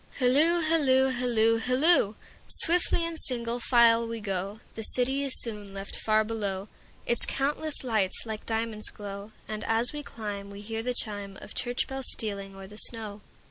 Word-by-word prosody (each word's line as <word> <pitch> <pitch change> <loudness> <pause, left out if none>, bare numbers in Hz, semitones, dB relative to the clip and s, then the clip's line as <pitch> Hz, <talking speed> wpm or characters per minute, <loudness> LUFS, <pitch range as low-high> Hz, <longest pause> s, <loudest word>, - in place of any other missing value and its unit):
Hilloo, 295 +7 +3
hilloo, 275 -5 +3
hilloo, 235 -3 +1
hilloo! 255 - +3 0.3
Swiftly 340 0 +2
in 335 -1 -4
single 240 -4 +2
file 235 -1 +4
we 230 0 -5
go, 195 0 -4
The 225 - -7
city 255 +5 +2
is 275 -2 +1
soon 210 -4 -5
left 195 0 -6
far 215 0 +1
below, 205 -3 -4 0.4
Its 235 - +5
countless 295 +2 -1
lights 215 -7 0
like 220 -1 -6
diamonds 225 -1 0
glow; 200 0 -9 0.2
And 215 0 -6
as 225 +4 +2
we 295 - -5
climb 205 -6 -7
we 200 0 -10
hear 225 +1 -5
the 250 +1 -3
chimeOf 205 -3 -5
church 245 0 -2
bells 265 -1 -5
stealing 200 -3 -4
o'er 195 0 -10
the 210 +2 -13
snow. 215 -3 +5
225 Hz, 165 wpm, -27 LUFS, 210-255 Hz, 0.4 s, Its